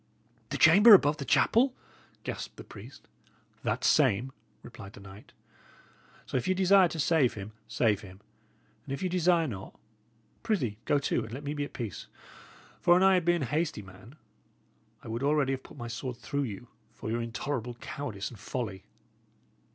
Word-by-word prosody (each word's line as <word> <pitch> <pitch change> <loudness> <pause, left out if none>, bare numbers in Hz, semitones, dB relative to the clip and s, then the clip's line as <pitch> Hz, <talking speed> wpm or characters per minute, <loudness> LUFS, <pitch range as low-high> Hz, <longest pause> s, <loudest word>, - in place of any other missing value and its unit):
"The - - -2
chamber 205 +7 +9
above 150 -4 +3
the 140 - -5
chapel!" 245 - +3 0.5
gasped - - -6
the - - -9
priest. - - -13 0.5
"That - - -2
same," 130 -3 +3 0.3
replied 100 +1 -11
the - - -12
knight. 100 +1 -13 0.9
"So - - -2
if 125 - -2
ye 185 - +2
desire 190 0 +5
to 165 0 -6
save 150 -4 +2
him, 100 0 -7 0.2
save 110 -4 +1
him; 95 -2 -12 0.6
and - - -6
if 140 - -7
ye 185 - 0
desire 175 -1 +3
not, 95 -7 -8 0.6
prithee, 125 - -1
go 145 - +3
to, 140 - 0
and 110 - -11
let 135 +5 -7
me 145 +1 -3
be 145 -1 -2
at - - -12
peace! 115 -6 -6 0.7
For 175 0 +5
an 185 - +3
I 190 0 +6
had 180 -3 +2
been 175 -3 +2
a - - -1
hasty 150 -4 -2
man, 95 +7 -14 0.9
I - - -10
would 115 +2 -4
already 145 -1 +2
have 135 -1 -3
put - - -15
my 120 - -6
sword 120 +1 -5
through 140 +5 -2
you, 105 +4 -9 0.3
for 110 - -5
your 120 +1 -1
intolerable 120 +1 -4
cowardice 120 -6 -6
and 115 - -12
folly. 105 -6 -5
135 Hz, 180 wpm, -29 LUFS, 110-165 Hz, 0.9 s, chamber